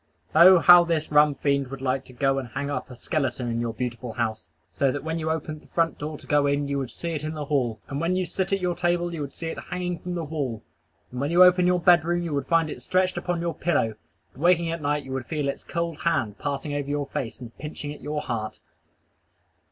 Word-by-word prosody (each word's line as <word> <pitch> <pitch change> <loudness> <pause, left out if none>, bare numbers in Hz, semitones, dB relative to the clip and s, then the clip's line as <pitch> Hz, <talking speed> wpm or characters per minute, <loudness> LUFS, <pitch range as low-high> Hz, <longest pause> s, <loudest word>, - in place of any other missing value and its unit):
Oh, 180 +4 +9
how 175 +1 +8
this 165 -3 -1
Rum 150 -1 +5
Fiend 140 0 0
would 135 +1 -7
like 135 0 -1
to 130 - -13
go 135 +2 +1
and 130 - -6
hang 140 +4 -3
up 130 -1 -4
a 125 - -9
skeleton 130 -2 -2
in 115 0 -1
your 120 -1 -1
beautiful 120 0 -4
house, 110 -2 -3 0.2
so 140 -2 +1
that 145 - -4
when 160 +1 -2
you 160 0 -2
opened 155 -1 -3
the - - -20
front 165 -1 0
door 150 +1 -4
to - - -14
go 145 -1 +3
in 140 0 0
you 140 0 -1
would 130 -3 -3
see 170 +5 -5
it 155 -2 -3
in 155 +1 -4
the 150 -1 -4
hall; 125 -7 0
and 140 +1 -4
when 170 +2 +1
you 185 0 0
sit 190 +2 -2
at 195 - +2
your 180 -1 0
table 175 0 0
you 160 - -4
would 140 -1 -4
see 165 - -4
it - - -5
hanging 180 -2 -4
from 180 0 -5
the 170 - -2
wall; 140 -8 -4 0.5
and 125 +1 -4
when 140 - 0
you 175 +2 +7
open 180 0 +5
your 180 0 +3
bed 170 -1 +5
room 175 +1 0
you 165 -3 -3
would 140 -2 -2
find 165 -2 +2
it - - -7
stretched 185 0 +1
upon 175 -2 -2
your 170 -1 -1
pillow; 145 -10 0 0.4
and 130 - -13
waking 170 -1 +3
at 165 -1 -4
night 145 0 0
you 135 - -9
would 130 -2 -4
feel 150 -3 -2
its 140 - -3
cold 170 -2 -3
hand 130 -11 0
passing 145 +1 -3
over 145 -1 -3
your 145 0 -1
face 135 -5 -5
and 120 -2 -10
pinching 150 0 -6
at 150 - -13
your 150 0 -3
heart! 110 -3 -4
150 Hz, 260 wpm, -25 LUFS, 135-170 Hz, 0.5 s, Oh